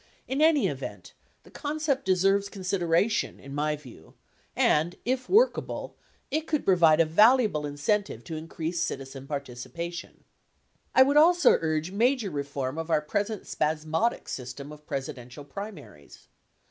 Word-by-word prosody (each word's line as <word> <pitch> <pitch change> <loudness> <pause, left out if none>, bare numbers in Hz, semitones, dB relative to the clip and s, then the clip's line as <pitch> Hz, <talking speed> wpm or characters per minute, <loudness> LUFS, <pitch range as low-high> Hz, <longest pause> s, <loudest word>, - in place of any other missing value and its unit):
In 270 +3 -1
any 315 -2 +5
event, - - -5 0.3
the - - -18
concept 290 -2 -2
deserves 195 +2 +2
con 195 -1 -9
sideration, 180 +3 +1
in 140 0 -10
my 150 +1 0
view; 125 - -15 0.4
and, 165 +4 +2
if 255 +1 -1
workable, 450 +6 +2 0.4
it 310 +3 -1
could 305 -2 -1
provide 170 -4 +5
a 165 - +5
valuable 210 - +4
incentive 170 +9 -1
to 165 - -6
increase 165 +1 -4
citizen 135 0 -5
participation. 150 +5 -6 0.7
I 260 - +9
would 285 +2 +2
also 345 +3 +6
urge 160 +1 -1
major 230 0 +1
reform 140 0 -3
of 165 +1 -5
our 160 - +3
present 205 +7 -2
spasmodic 160 +9 -1
system 130 +3 -6
of 150 0 -13
Presidential 135 0 -6
primaries. 165 - -10
170 Hz, 135 wpm, -27 LUFS, 150-220 Hz, 0.7 s, I